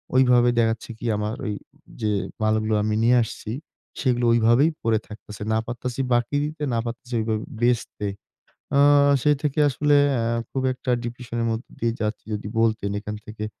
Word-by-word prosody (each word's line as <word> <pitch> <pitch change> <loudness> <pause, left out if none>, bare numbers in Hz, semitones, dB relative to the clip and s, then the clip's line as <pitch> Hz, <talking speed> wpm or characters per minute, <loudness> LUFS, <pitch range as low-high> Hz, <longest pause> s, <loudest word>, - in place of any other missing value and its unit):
ঐভাবে 125 -2 +5
দেখাচ্ছে 115 -1 0
কি? 120 - -8
আমার 105 +2 -2
ঐযে 105 +1 -5 0.3
মালগুলো 110 0 +1
আমি 105 0 0
নিয়ে 125 +2 +5
আসছি, 110 -1 -7 0.5
সেগুলো 125 -3 +1
ঐভাবেই 120 +6 +4
পড়ে 115 -1 +2
থাকতেছে। 105 -1 -9
না - - +3
পারতেছি 120 +1 -5
বাকি 120 +3 +1
দিতে, 150 0 -5
না 115 - +1
পারতেছি 120 +2 -7
ঐভাবে 110 0 -1 0.2
বেচতে। 120 -3 0 0.7
আ - - +5 0.4
সেই 150 -1 +4
থেকে 150 0 0
আসলে 145 +2 +2 0.2
অ্যা 115 -1 0 0.2
খুব 135 - -2
একটা 125 - -7
ডিপ্রেশনের 120 -1 -4
মধ্যে 115 +2 -4
দিয়ে 115 0 0
যাচ্ছি। 105 0 -3
যদি 105 0 -4
বলতেন, 110 -3 +1
এখান 105 0 -6
থেকে 110 0 -6
115 Hz, 160 wpm, -24 LUFS, 110-125 Hz, 0.7 s, ঐভাবে